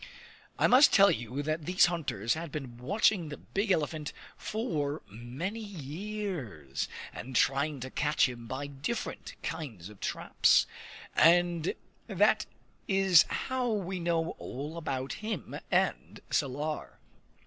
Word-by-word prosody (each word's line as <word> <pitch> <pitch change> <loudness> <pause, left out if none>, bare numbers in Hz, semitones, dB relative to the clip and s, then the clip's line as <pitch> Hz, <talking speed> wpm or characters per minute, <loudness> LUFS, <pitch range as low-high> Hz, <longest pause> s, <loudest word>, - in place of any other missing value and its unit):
I - - +3
must 260 +4 +7
tell 200 -1 +7
you 120 -3 -4
here 145 - -1
that 155 +1 -2
these 180 +1 +6
hunters 150 - -1
had 160 -1 -5
been 130 -5 -6
watching 190 - +2
the 145 - -6
big 200 +2 -2
elephant 155 -3 0 0.2
for 160 - -2
many 130 - -5
years, 170 - -5 0.3
and 130 +2 -7
trying 140 +3 +2
to 130 +1 -6
catch 150 -1 +2
him 120 -2 -8
by 130 +4 -4
different 140 +12 -4
kinds 130 - -5
of 105 -2 -14
traps; - - +3 0.5
and 175 0 +4 0.3
that - - +3 0.4
is 190 -3 +6
how 260 -2 -1
we 190 -3 -2
know 170 -1 0
all 145 +5 -6
about 135 -5 -3
him 215 -7 -4
and - - 0
Salar. 145 +3 -2
155 Hz, 130 wpm, -30 LUFS, 135-190 Hz, 0.5 s, must